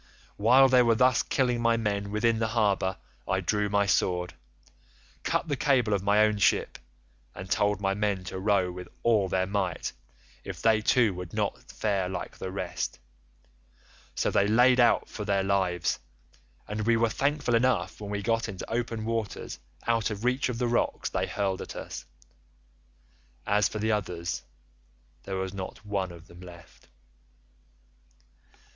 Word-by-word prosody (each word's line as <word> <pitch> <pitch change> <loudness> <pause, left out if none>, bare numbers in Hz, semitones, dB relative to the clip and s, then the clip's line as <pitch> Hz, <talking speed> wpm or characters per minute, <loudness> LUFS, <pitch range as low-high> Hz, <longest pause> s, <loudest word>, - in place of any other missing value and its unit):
While 125 +6 +6
they 130 -1 +5
were 115 -1 +4
thus 125 0 +4
killing 125 -3 0
my 115 0 +3
men 100 -2 -1
within 110 +2 +1
the 110 - +1
harbour 100 -4 +1 0.3
I - - +1
drew 105 -1 0
my 100 0 +2
sword, 90 -2 +1 0.9
cut - - -1
the 145 - 0
cable 125 -5 +2
of 100 - +1
my 105 +2 +4
own 105 -1 0
ship, - - +2 0.6
and 95 - -7
told 105 +1 +1
my 95 -1 0
men 100 -2 -1
to 95 +1 -6
row 95 -2 +2
with 90 0 -8 0.2
all 105 -5 +3
their 95 0 +1
might 95 -3 -2 0.5
if - - -7
they 110 -1 +3
too 110 -1 +3
would 90 -1 -8
not - - -2
fare 100 -4 -1
like 90 -1 -5
the 95 - -4
rest; 95 -2 -4 1.2
so - - 0
they 100 - +3
laid 125 +4 +5
out 120 - +4
for 105 - -6
their 100 -1 +1
lives, 95 -4 0 0.7
and 105 +1 -3
we 115 -1 +4
were 115 0 +3
thankful 140 +2 0
enough 115 -6 +1
when 100 - -6
we 100 0 -3
got 115 +1 0
into 95 -2 -7
open 115 -2 -2
water 115 -2 -3 0.4
out 115 -1 +1
of 105 +1 -5
reach 125 +1 +1
of 120 - -3
the 125 - 0
rocks 120 - 0
they - - -1
hurled 95 -2 -2
at - - -7
us. - - -7 1.4
As 105 0 +2
for - - -5
the 110 +1 0
others 85 -7 -2 0.8
there 95 - -4
was 95 0 -3
not 95 +1 -7
one 100 -3 -2
of 85 -1 -12
them 85 -1 -15
left. 90 -1 -14
105 Hz, 165 wpm, -28 LUFS, 95-115 Hz, 1.4 s, While